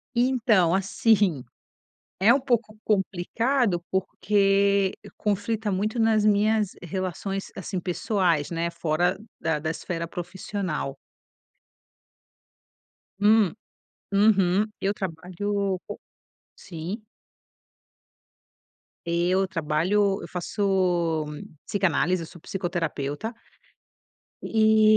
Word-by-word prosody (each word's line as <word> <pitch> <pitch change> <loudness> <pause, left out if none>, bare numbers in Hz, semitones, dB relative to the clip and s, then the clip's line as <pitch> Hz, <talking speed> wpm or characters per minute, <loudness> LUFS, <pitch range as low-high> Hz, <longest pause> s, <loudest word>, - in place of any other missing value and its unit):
Então, 235 -8 +3
assim, 195 - +2 0.8
é 220 +5 +7
um 275 - +3
pouco 235 -5 0
complicado, 210 +1 +1
porque 195 0 +2 0.2
conflita 210 +1 -1
muito 215 +5 -1
nas 225 -2 +3
minhas 210 0 +3
relações, 185 +2 -4
assim, 190 -1 -4
pessoais, 180 - 0
né, 170 0 -1
fora 170 +2 0 0.2
da 160 -2 0
da 160 +1 -3
esfera 170 0 -4
profissional. 175 -4 -4 2.2
Hum, 210 -2 +5 0.6
uhum, 200 -1 +4 0.2
eu 200 +1 +1
trabalho 190 +2 -2
com - - -5 0.6
sim 185 +6 -7 2.0
Eu 175 +3 +2
trabalho 185 +4 +1
eu - - -7
faço 180 -3 0 0.4
psicanálise, 180 -2 +1
eu - - -6
sou 170 - -14
psicoterapeuta... 175 - -3 1.1
e 220 -1 +5
195 Hz, 85 wpm, -25 LUFS, 175-210 Hz, 2.2 s, é